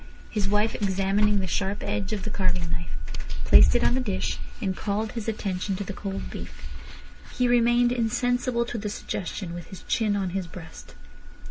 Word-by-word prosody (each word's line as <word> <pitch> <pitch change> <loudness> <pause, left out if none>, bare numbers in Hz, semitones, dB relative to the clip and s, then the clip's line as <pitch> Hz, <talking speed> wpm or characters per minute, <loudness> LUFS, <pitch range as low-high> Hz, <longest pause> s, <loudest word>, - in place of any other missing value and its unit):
His 205 -3 0
wife 210 +2 +2
examining 200 +1 +2
the - - -1
sharp 195 +3 -1
edge 205 -1 -2
of 205 -3 -2
the 215 - -3
carving 180 -4 0
knife, 170 -1 -3 0.6
placed 65 0 +8
it - - +3
on - - +4
the 260 - +2
dish, 205 -7 -1 0.2
and 190 -1 -1
called 215 +1 -1
his 230 -3 -5
attention 195 -3 -1
to 200 - -3
the 200 - -5
cold 195 0 -5
beef. - - -8 0.7
He 250 - +3
remained 240 0 +4
insensible 245 +1 +1
to 235 -1 -4
the 210 0 -3
suggestion, 185 -3 -4
with 175 -1 -7
his 190 - -10
chin 215 -3 +1
on 190 -3 -1
his 190 -1 -2
breast. 165 -1 -11
205 Hz, 180 wpm, -26 LUFS, 185-225 Hz, 0.7 s, placed